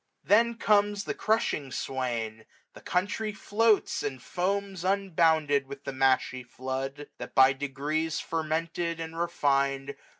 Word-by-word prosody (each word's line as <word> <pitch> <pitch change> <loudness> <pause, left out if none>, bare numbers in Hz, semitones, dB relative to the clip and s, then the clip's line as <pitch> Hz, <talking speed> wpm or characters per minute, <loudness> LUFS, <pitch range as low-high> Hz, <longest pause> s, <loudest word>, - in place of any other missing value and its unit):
Then 230 +3 +4
comes 205 -2 +2
the - - -3
crushing 215 - 0
swain; 115 -5 -3 0.3
the - - -13
country 205 +4 -1
floats. 215 +1 +2
And 135 -3 -3
foams 190 +4 -2
unbounded 160 -7 +2
with 140 0 -9
the 135 - -4
mashy 130 -1 +2
flood; 130 +3 -5
That - - -8
by 135 0 +7
degrees 145 +4 -2
fermented, 165 +1 -2
and 165 0 -5
refin'd. 140 -5 0
160 Hz, 125 wpm, -28 LUFS, 135-195 Hz, 0.3 s, by